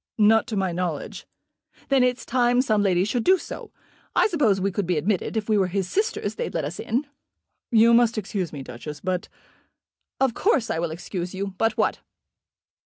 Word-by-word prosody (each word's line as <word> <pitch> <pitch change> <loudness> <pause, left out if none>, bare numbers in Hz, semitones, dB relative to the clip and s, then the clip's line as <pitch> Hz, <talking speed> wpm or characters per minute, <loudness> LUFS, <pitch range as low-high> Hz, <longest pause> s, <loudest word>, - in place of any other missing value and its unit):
"Not 220 +2 +4
to 225 - -3
my 190 -2 0
knowledge." 170 -4 -4 0.6
"Then 270 -1 +4
it's 250 0 0
time 245 0 +2
some 215 -5 +2
lady 185 -2 +2
should 235 +2 -1
do 375 +1 +5
so. - - -8 0.4
I - - +5
suppose 255 - +2
we 195 +1 0
could 190 -1 -2
be 180 -3 +1
admitted. 190 +7 -1
If 215 - -2
we 215 -2 +3
were 190 - +2
his 190 0 -2
sisters 425 - -1
they'd 485 - -4
let - - 0
us - - -6
in." 250 +6 -1 0.6
"You 230 0 +5
must 235 -1 +4
excuse 195 -3 -3
me, 140 -3 -7
Duchess, 145 +4 -8
but 185 -1 -3 0.5
" - - -60
"Of 265 -3 +2
course 260 - +1
I 160 - -1
will 170 0 -1
excuse 175 +2 -5
you. 195 0 -4
But 225 -1 +1
what?" - - +1
210 Hz, 195 wpm, -24 LUFS, 185-240 Hz, 0.6 s, do